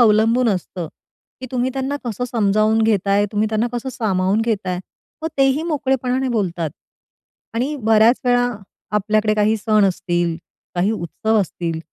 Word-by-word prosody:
अवलंबून 230 +2 +4
असतं 180 -3 -3 0.5
की 255 - -6
तुम्ही 255 +1 0
त्यांना 270 +2 -2
कसं 240 +1 -3
समजावून 215 -1 +2
घेताय? 205 -2 +2
तुम्ही 210 +1 +1
त्यांना 220 +2 0
कसं 240 +2 -3
सामावून 195 -1 +1
घेताय? 195 -6 -1 0.4
मग 320 - -1
तेही 270 +3 +3
मोकळेपणाने 265 -4 0
बोलतात. 175 -9 -1 0.8
आणि 265 +6 -1
बऱ्याच 225 +2 +4
वेळा 245 0 +3 0.5
आपल्याकडे 215 +1 +1
काही 215 +1 +2
सण 215 0 +2
असतील, 175 -3 0 0.4
काही 180 +4 +1
उत्सव 220 +4 0
असतील. 170 -3 -3
220 Hz, 135 wpm, -20 LUFS, 195-245 Hz, 0.8 s, अवलंबून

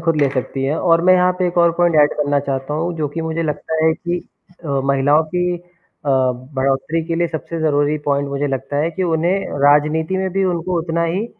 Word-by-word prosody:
खुद 165 -1 +1
ले 140 - +4
सकती 135 0 -3
हैं 145 +4 0
और 165 -2 +3
मैं 185 0 +6
यहाँ 180 0 +3
पे 185 - +1
एक 175 0 -1
और 170 -1 +5
पॉइंट 175 -1 +2
एड 145 - +3
करना 145 -1 +1
चाहता 135 +1 -3
हूँ, 170 +3 -2
जो 155 -2 -1
कि 165 +4 -5
मुझे 160 +1 -2
लगता 160 +1 -2
है 160 - +4
कि 175 +2 -3 0.5
अ, - - -6 0.2
महिलाओं 140 +3 +3
की 180 0 0
अ, - - -20 0.5
बढ़ोत्तरी 135 +4 0
के 165 - -2
लिए 170 +1 +1
सबसे 165 +1 -5
ज़रूरी 145 -1 +1
पॉइंट 140 0 0
मुझे 140 +1 -2
लगता 135 +1 -3
है 155 +3 +1
कि 180 +3 -4
उन्हें 175 +3 0 0.2
राजनीति 150 +4 +2
में 190 0 -1
भी 195 +1 +1
उनको 180 0 -1
उतना 165 0 -1
ही 185 +7 -1
160 Hz, 220 wpm, -19 LUFS, 145-170 Hz, 0.5 s, मैं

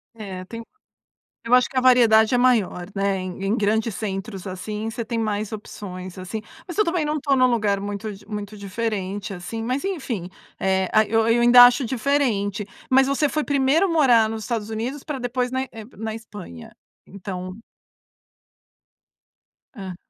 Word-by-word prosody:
É, 195 -4 -7
tem 230 +3 -8 0.8
Eu 235 - +3
acho 250 -1 +5
que - - -11
a - - +4
variedade 235 -3 +5
é 245 - +4
maior, 225 -8 +2
né, 195 -1 0
em 185 +1 -5
em 215 +4 +1
grandes 220 0 0
centros, 195 -1 -5
assim, 210 +4 -4
você 230 +1 -4
tem 230 +1 -3
mais 215 -1 -2
opções, 185 -3 -8
assim. 200 +4 -5 0.3
Mas 350 - -6
eu 425 - +4
também 335 -3 0
não 300 +1 -1
estou 280 -1 +1
num 255 -1 +5
lugar 210 -5 +1
muito 205 +1 -4
di 200 +1 -14
muito 210 0 -6
diferente, 200 0 -3
assim. 195 +5 -6
Mas 255 +4 -1
enfim, 260 - -3 0.3
eh, 190 -1 +1
a 215 0 +5
Eu 225 +1 +1
eu 235 +1 +3
ainda 245 +1 +9
acho 245 +2 +4
diferente. 225 -6 0 0.2
Mas 265 +1 +5
você 280 +2 +1
foi 305 +1 -1
primeiro 285 +6 +2
morar 250 -9 +4
nos 220 0 -5
Estados 225 -2 -3
Unidos 245 +6 -4
para 295 -4 -5
depois 250 0 -2
na 260 +1 -1
eh, 225 -4 -8
na 220 +1 -4
Espanha? 205 - -10 0.4
Então 185 0 -7 2.2
Ah. 190 -4 -7
220 Hz, 170 wpm, -23 LUFS, 200-250 Hz, 2.2 s, ainda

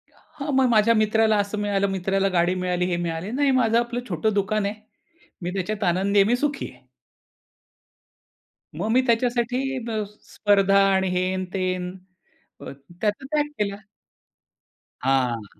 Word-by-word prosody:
हां, 285 0 -7
मग 265 -1 +4
माझ्या 225 0 +4
मित्राला 220 0 +3
असं 205 +1 -1
मिळालं 200 -1 0
मित्राला 195 +1 0
गाडी 175 +2 +2
मिळाली, 180 -1 -1
हे 175 -1 -1
मिळाले, 170 +4 -4
नाही 280 +2 +2
माझं 230 0 +3
आपलं 240 0 -2
छोटं 200 +5 0
दुकान 205 +1 0
आहे 200 - -1 0.7
मी 175 0 -3
त्याच्यात 205 +2 -3
आनंदी 195 +3 +2
आहे 195 - +5
मी 240 - +3
सुखी 285 +2 -2
आहे. - - -22 1.9
मग - - -2
मी 255 +3 +4
त्याच्यासाठी 240 +1 +1 0.3
अ, 215 -1 -1 0.3
स्पर्धा 200 -1 +3
आणि 190 0 +1
हेन 185 +1 -1
तेन 185 -1 -2 0.7
त्याचा 175 - -5
त्याग 295 +1 0
केला. 200 -1 -1 1.3
हां. 125 -4 0
200 Hz, 140 wpm, -24 LUFS, 185-225 Hz, 1.9 s, आहे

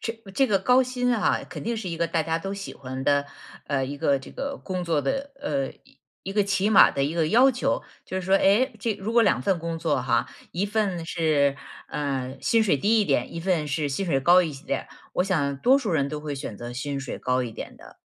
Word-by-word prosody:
这 225 - -3 0.2
这 270 - +3
个 205 -5 +2
高 250 +6 +4
薪 250 -1 0
啊， 215 - +1
肯 - - -7
定 235 +1 -2
是 215 -4 -4
一 170 - -4
个 170 +1 0
大 165 -1 0
家 165 +1 -1
都 195 +3 -5
喜 200 -1 -6
欢 130 0 -6
的， 145 0 +2 0.4
呃， 135 -2 0
一 140 +2 -5
个 140 0 +2
这 135 - -12
个 275 0 -4
工 185 -2 -3
作 165 -4 +1
的， 270 - -2
呃， 140 - -2 0.5
一 195 - -4
个 205 0 +3
起 200 0 +1
码 205 - +8
的 140 - 0
一 150 +4 -2
个 160 -2 +1
要 250 +7 +6
求， 250 - -1 0.2
就 185 - -5
是 180 - -8
说， 190 - +4
哎， 205 +8 +3
这 225 0 0
如 205 +3 -5
果 235 0 +5
2 210 - +3
份 195 -3 +1
工 165 0 -3
作 150 -6 0
哈， 120 -2 +1 0.2
一 185 +4 -1
份 200 -5 -1
是， 150 -5 +1 0.3
啊， 135 -3 -3
薪 230 +8 +3
水 180 -8 +3
低 215 +10 +3
一 - - +2
点， 135 -7 0
一 170 - -5
份 165 -3 0
是 145 +1 -1
薪 140 +8 -2
水 160 -7 +1
高 175 +7 +6
一 160 -3 -3
些 135 0 -11
点， - - -2 0.3
我 180 - +2
想 145 -8 0
多 260 - +5
数 230 -9 -2
人 140 -3 +1
都 150 +1 -4
会 150 -1 -4
选 135 -6 -6
择 120 +2 -7
薪 140 +3 -3
水 135 -1 -5
高 125 0 0
一 115 - -6
点 - - -8
的。 - - -16
170 Hz, 260 characters per minute, -25 LUFS, 140-205 Hz, 0.5 s, 码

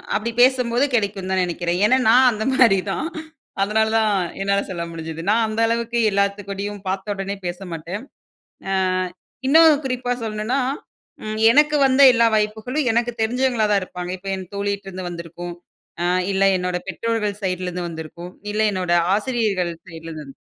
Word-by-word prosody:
அப்படிப் 230 +3 -2
பேசும்போது 250 -1 +3
கெடைக்கும்ன்னு 200 -4 -1
தான் 185 -1 +2
நினைக்கிறேன். 175 0 -2
ஏன்னா 255 +5 +4
நான் 250 +2 +6
அந்த 215 0 -3
மாரிதான். 200 +2 +2 0.5
அதனாலதான் 220 +1 +2 0.3
என்னால 200 0 +1
சொல்ல 175 -2 -4
முடிஞ்சது. 165 -1 -6
நான் 225 +2 +3
அந்த 220 +1 -4
அளவுக்கு 235 +1 -1
எல்லாத்துக்கூடயும் 200 0 -2
பார்த்தவுடனே 195 +1 -3
பேசமாட்டேன். 175 +2 -6 0.7
அ - - 0 0.7
இன்னும் 310 +1 +6
குறிப்பா 250 -1 -2
சொல்லணும்னா, 220 +5 -1 0.6
ம் 215 0 -4
எனக்கு 300 +4 +4
வந்த 265 +1 +4
எல்லா 230 -1 +4
வாய்ப்புகளும் 220 +7 -1
எனக்குத் 235 0 -1
தெரிஞ்சவங்களாதான் 220 -4 +1
இருப்பாங்க. 180 -1 -6
இப்ப 195 - -9
என் 185 -2 -8
தோழிட்ட 200 0 -3
இருந்து 185 -1 -6
வந்திருக்கும், 175 +1 -7 0.5
அ 175 - +1 0.3
இல்ல 195 0 +2
என்னோட 180 0 -2
பெற்றோர்கள் 210 0 -2
சைடுல 185 -1 -2
இருந்து 180 0 -4
வந்திருக்கும். 170 +2 -8
அ - - -6
இல்ல 215 +1 +1
என்னோட 180 -2 0 0.2
ஆசிரியர்கள் 210 -7 -1
சைடுல 165 -2 -10
இருந்து 155 -1 -8
வந்திருக்கும். 135 - -15
205 Hz, 145 wpm, -21 LUFS, 180-230 Hz, 0.7 s, நான்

